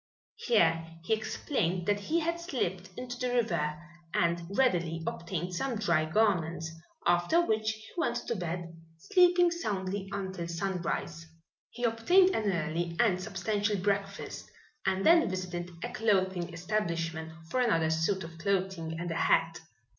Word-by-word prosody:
Here 165 -8 +2 0.2
he 200 - +1
explained 215 - -1
that 205 +1 +2
he 320 +12 0
had 335 +1 -1
slipped 190 - -3
into 245 -1 -6
the 250 -1 0
river 160 -10 0 0.4
and 170 0 +2 0.2
readily 170 -10 +2
obtained 175 +1 -3
some 250 +8 -1
dry 170 -7 +2
garments, 165 -3 +1 0.3
after 175 - +3
which 220 -9 +1
he 220 0 -5
went 320 -9 0
to 235 - -1
bed, 175 -2 -4 0.2
sleeping 355 - +4
soundly 195 - -3
until 190 -3 -4
sunrise. 170 -2 -3 0.4
He 240 - -8
obtained 350 +12 +5
an 210 -2 +1
early 170 0 -2
and 190 -6 +3
substantial 205 +2 -1
breakfast 200 +1 -2 0.4
and 190 0 +1
then 335 - +6
visited 180 -2 -4
a - - -4
clothing 190 -5 +1
establishment 165 -3 -2 0.2
for 255 - +1
another 165 -10 +2
suit 165 +4 +1
of 165 0 -10
clothing 185 -3 -1
and 175 0 -3
a - - -2
hat. 165 0 +2
190 Hz, 140 wpm, -30 LUFS, 170-220 Hz, 0.4 s, then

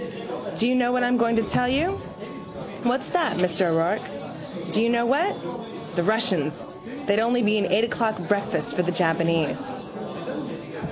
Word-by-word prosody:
Do 225 - +2
you 250 - +3
know 245 -1 +3
what 250 0 +2
I'm 245 0 +3
going 230 -1 +3
to 225 - +3
tell 250 +2 +1
you? 330 +9 +1 0.9
What's 255 +2 0
that, 340 - +1
Mr 180 0 +2
O'Rourke? 165 +5 +2 0.7
Do 215 - +2
you 230 - +3
know 235 0 +2
what? 300 +11 +2 0.6
The 175 - +2
Russians, 180 -7 +1 0.4
they'd 200 +1 +3
only 240 +2 +2
be 210 0 +3
an 200 - +1
eight 200 +5 +3
o'clock 225 -1 0
breakfast 200 -1 0
for 180 - +2
the 180 0 0
Japanese. 165 -2 +1
220 Hz, 160 wpm, -25 LUFS, 180-245 Hz, 0.9 s, you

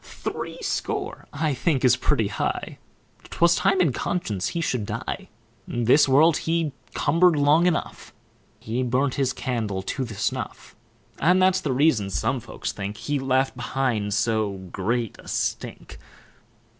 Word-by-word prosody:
Threescore, - - -4
I 150 0 0
think, 135 0 +1
is 125 - +6
pretty - - +1
high; - - -3 0.5
'Twas 170 0 +3
time 195 +1 +2
in 165 -8 +3
conscience 110 - -2
he 170 - -3
should 125 -10 -1
die. - - -4 0.4
This 120 +5 +3
world 150 +4 +5
he 165 -2 0 0.2
cumber'd 170 +3 +4
long 150 +4 +4
enough; 170 -4 -2 0.5
He 115 +3 -3
burnt 130 +2 +1
his 135 -2 +1
candle 110 -7 -3
to 130 +7 -3
the 115 -4 -7
snuff; - - -4 0.4
And 180 +5 +4
that's 185 0 +3
the 145 - -1
reason, 130 -7 +2
some 130 +6 0
folks 120 - -5
think, 100 +1 -5
He 145 +5 -2
left 135 0 +1
behind 120 -5 -1
so 110 -2 +1 0.2
great 115 +3 -1
a - - -14
stink. - - -3
130 Hz, 145 wpm, -24 LUFS, 115-160 Hz, 0.5 s, is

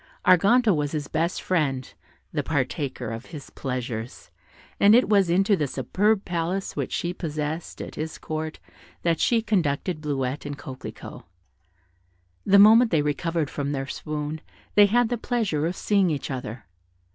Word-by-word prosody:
Arganto 200 +4 +5
was 145 0 -2
his 150 -2 -3
best 165 +3 -1
friend, 135 -8 -1 0.4
the - - 0
partaker 135 -5 -2
of 115 +2 -7
his 150 -5 -10
pleasures, 125 -3 -5 0.5
and 205 +2 +7
it 250 - +4
was 200 -4 +3
into 195 +4 +3
the 150 -6 -1
superb 195 - 0
palace 175 +2 -2
which - - -3
she 175 0 -2
possessed 155 -1 -4
at - - -9
his 155 +1 -5
court 155 0 -5 0.5
that 165 -2 +1
she 230 -2 +2
conducted 175 -5 0
Bleuette 140 -2 -2
and 145 -1 -5
Coquelicot. 130 -2 -9 1.3
The 200 0 +6
moment 220 +4 +7
they 160 -6 +2
recovered 155 +1 -1
from 145 0 -3
their 135 -1 -2
swoon 150 +2 -5 0.3
they 205 -1 +7
had 240 +2 +2
the 240 -2 -2
pleasure 210 -12 0
of 175 - -3
seeing 200 -3 +2
each 145 -2 -3
other. 120 -3 -6
160 Hz, 155 wpm, -25 LUFS, 145-195 Hz, 1.3 s, and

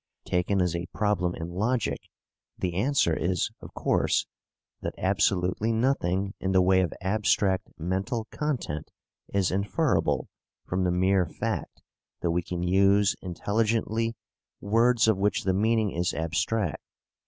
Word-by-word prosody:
Taken 90 +2 +1
as 90 -2 -1
a 85 0 -3
problem 100 -4 +1
in 80 0 -5
logic, 110 +6 -1 0.5
the 90 -2 -2
answer 105 - +2
is, 90 +2 0
of - - -11
course, - - +1 0.6
that - - -4
absolutely 95 +2 +1
nothing 100 -6 0
in 95 0 -1
the 95 - +5
way 95 0 +4
of 90 - 0
abstract 100 0 +1
mental 95 +7 -2
content 130 - -3 0.4
is 100 -3 +1
inferable 105 - +1 0.4
from 90 0 -1
the 90 - +2
mere 95 0 +2
fact - - -4 0.4
that 85 - +1
we 85 +1 +1
can 85 0 -4
use 100 +2 +4
intelligently 110 +4 -1 0.4
words 115 +3 +3
of 110 -4 +3
which 100 0 +1
the 95 - +1
meaning 110 +1 +2
is 85 +1 -1
abstract. 85 +4 -1
95 Hz, 135 wpm, -27 LUFS, 90-110 Hz, 0.6 s, the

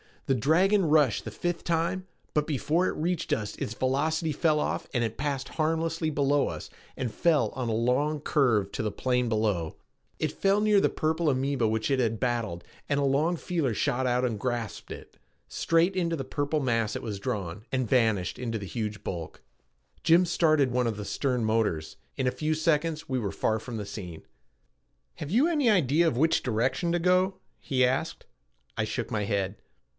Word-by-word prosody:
The - - +2
dragon 180 - +3
rushed 150 -7 +3
the - - -3
fifth 175 -1 -3
time, 170 +3 0 0.3
but 150 -1 +1
before 160 +4 +1
it - - -2
reached 170 0 -1
us 105 -2 -2
its 105 - -3
velocity 155 +5 0
fell 155 +1 +2
off - - -2
and 120 - +2
it 110 -1 -3
passed 140 -2 -2
harmlessly 160 +1 0
below 145 -1 +2
us - - -6 0.3
and 120 -4 -3
fell 150 -5 +2
on 125 +1 -4
a - - 0
long 130 +7 +1
curve 115 -11 +2
to - - -3
the 105 -2 -2
plain 125 -1 0
below. 105 -7 0 0.4
It - - 0
fell 200 +1 +2
near 210 -1 +4
the - - +3
purple 160 0 0
amoeba 135 -3 +1
which 110 +4 -1
it 135 - +2
had 115 -3 0
battled 115 -8 -1 0.3
and 145 - +2
a - - +1
long 145 +6 +2
feeler 165 -7 -1
shot 130 +4 0
out 125 0 +1
and 115 -4 -2
grasped 120 -2 -3
it. - - -10 0.3
Straight 170 +3 +2
into 170 -2 +1
the 135 - -4
purple 145 +3 -1
mass 115 -4 0
it - - -5
was 105 -4 -4
drawn, 100 -4 -4
and 130 -3 0
vanished 110 -7 +1
into 115 -2 -2
the 100 - -6
huge 105 0 -4
bulk. 85 -3 -6 0.6
Jim 170 +3 +5
started 155 -6 +3
one 125 0 +1
of 115 - -1
the 105 - -5
stern 125 -1 -1
motors. 105 -9 0 0.2
In 130 - -1
a 125 - +2
few 155 +3 -1
seconds 155 -1 0
we 130 -1 0
were 100 -4 -3
far 110 +2 0
from 120 +2 -7
the 105 - -4
scene. 95 -5 -8 0.9
"Have 145 - -6
you 245 - +4
any 295 -8 +2
idea 170 - +3
of 120 - 0
which 160 +4 +3
direction 130 +8 0
to 175 - +2
go?" 185 +2 +3 0.2
he 130 -2 +2
asked. 135 +6 -2 0.5
I - - +1
shook - - -4
my 105 -2 -1
head. 100 -1 -1
135 Hz, 190 wpm, -28 LUFS, 115-160 Hz, 0.9 s, Jim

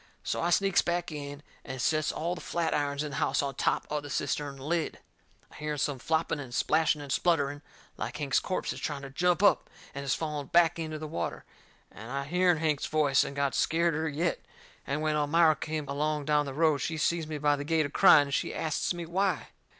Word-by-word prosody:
So - - -2
I 170 - +1
sneaks 195 +2 +3
back 175 -1 -2
in 145 -1 -7 0.2
and 130 -1 -7
sets 155 +4 +1
all 170 +2 -2
the 180 - -7
flatirons 145 -4 -1
in 150 - -5
the - - -5
house - - +1
on 140 -1 -2
top 135 - 0
of 150 0 -1
the 145 - -9
cistern 140 0 -2
lid. 155 +4 -2 0.5
I - - -15
hearn 150 -1 -3
some 140 -1 -1
flopping 160 +2 0
and 130 -4 -7
splashing 155 -2 +2
and 140 - -7
spluttering, 145 -3 +1 0.4
like - - -4
Hank's 145 -3 +1
corpse 185 - -2
is - - -8
trying 145 -2 -4
to 135 - -8
jump 180 +6 +1
up 205 - +4 0.2
and 140 - -5
is 135 - +1
falling 150 -3 -4
back 170 +1 +4
into 155 -1 -4
the 155 - -6
water, 85 - -4 0.5
and 110 +3 -10
I 140 0 -2
hearn 180 +2 +3
Hank's 150 -2 0
voice, 150 -3 +3
and 140 - -6
got 140 -2 0
scareder 160 +3 +1
yet. 165 +4 -1 0.4
And 145 +3 -1
when 155 -1 +1
Elmira 155 +2 +4
come 155 -1 -4
along 150 +1 -1
down 150 -1 +2
the 135 - -5
road, 155 -2 +3
she 160 +2 -2
seen 160 +1 0
me 155 - -3
by 145 0 +2
the 145 - -5
gate 160 0 +1
a - - -3
crying, 145 - +7
and 140 -1 -6
she - - -1
asts 160 +2 -1
me 170 -1 -5
why. 180 -1 -1
150 Hz, 220 wpm, -29 LUFS, 140-165 Hz, 0.5 s, crying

